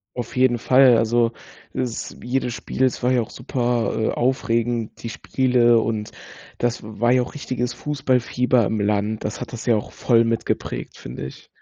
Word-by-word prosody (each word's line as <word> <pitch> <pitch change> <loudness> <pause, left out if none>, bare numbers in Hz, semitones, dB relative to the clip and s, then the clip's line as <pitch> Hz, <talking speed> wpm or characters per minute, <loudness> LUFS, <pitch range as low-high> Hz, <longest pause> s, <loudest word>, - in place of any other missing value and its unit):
Auf 120 -2 -5
jeden 125 -2 +3
Fall, 130 +1 +6
also 115 +1 +2 0.4
s 125 -3 -3
jedes 125 0 -1
Spiel, 130 - -3
es 130 - +1
war 125 +1 +2
ja 125 - +3
auch 110 - -6
super, 120 -2 -1
äh 110 - +1
aufregend, 120 -2 -1
die 115 - -5
Spiele 120 0 +3
und 110 -1 -2 0.5
das 120 -1 -1
war 110 +3 0
ja 125 0 +4
auch 125 - -9
richtiges 125 -4 -3
Fußballfieber 125 -2 +1
im 110 +2 -1
Land. 105 +1 0
Das 105 - -4
hat - - -6
das 120 - -6
ja 120 - +4
auch 105 - -3
voll 115 -2 +3
mitgeprägt, 115 0 -2
finde 60 +2 -7
ich. 65 - -11
120 Hz, 175 wpm, -22 LUFS, 115-125 Hz, 0.5 s, Fall